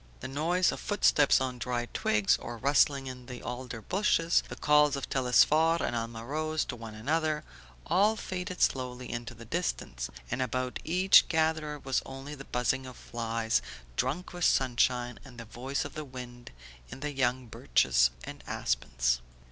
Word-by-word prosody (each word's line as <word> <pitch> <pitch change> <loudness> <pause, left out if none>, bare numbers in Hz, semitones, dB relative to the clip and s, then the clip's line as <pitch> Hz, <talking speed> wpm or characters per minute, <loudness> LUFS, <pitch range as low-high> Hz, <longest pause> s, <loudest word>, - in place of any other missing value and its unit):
The 130 - -4
noise 165 +7 +1
of - - -6
footsteps 155 -8 +4
on 130 -2 -3
dry 120 -1 -2
twigs, 105 -2 +2
of 120 -1 -8
rustling 140 0 +3
in 125 -1 -8
the 125 -2 -8
alder 125 -2 -6
bushes, 175 -4 +2
the - - -6
calls 150 -1 +4
of 140 - -4
Telesphore 150 +6 +4
and 120 - -1
Alma 115 0 -4
Rose 155 +3 -1
to 125 - -5
one 115 -2 -9
another, 155 +6 0 0.4
all 210 +4 +3
faded 185 -3 -5
slowly 125 -1 -1
into 120 0 -5
the 115 0 -11
distance, - - -3 0.2
and 130 - -1
about 130 0 -2
each 185 +3 +5
gatherer 160 -2 0
was 135 -2 -1
only 135 +2 -8
the 135 -2 -9
buzzing 130 +2 -1
of 125 - -10
flies 115 - -1 0.3
drunk 150 - -2
with 175 0 -4
sunshine, 125 -1 +2
and 130 -3 -13
the 115 - -8
voice 130 +5 -3
of - - -7
the 155 - -5
wind 125 -3 -9 0.4
in 135 - -9
the 150 0 -3
young 130 -1 0
birches 60 - +3
and - - -9
aspens. - - 0
130 Hz, 165 wpm, -30 LUFS, 120-150 Hz, 0.4 s, each